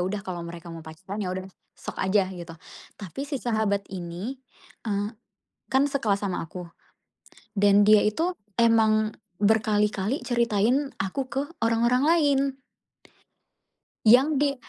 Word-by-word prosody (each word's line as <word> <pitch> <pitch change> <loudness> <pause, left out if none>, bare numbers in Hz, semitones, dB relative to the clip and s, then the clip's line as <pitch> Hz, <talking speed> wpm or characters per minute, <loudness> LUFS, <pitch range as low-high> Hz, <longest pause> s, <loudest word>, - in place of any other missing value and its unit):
udah 200 +2 -2
kalau 180 -2 -5
mereka 170 0 -9
mau 165 - -8
pacaran 185 +6 -7
ya 185 - -2
udah, 185 0 -4 0.3
sok - - -8
aja 190 0 +2
gitu. 175 -2 -8 0.5
Tapi 200 +6 -7
si 285 - -2
sahabat 215 -4 0
ini, 180 +8 -5 0.5
eee, 205 -1 -1 0.6
kan 265 +2 +4
sekelas 210 -8 0
sama 185 - -2
aku 180 +2 -8 0.9
dan 205 0 +5
dia 215 +1 +7
itu 330 - 0 0.2
emang 220 -2 +4 0.3
berkali-kali 210 +2 +1
ceritain 240 +3 +1
aku 255 +8 -3
ke 270 +3 -1 0.2
orang-orang 235 +3 +2
lain, 300 -4 +4 1.7
yang 265 +6 +6
di 280 0 +2
215 Hz, 125 wpm, -26 LUFS, 190-250 Hz, 1.7 s, dia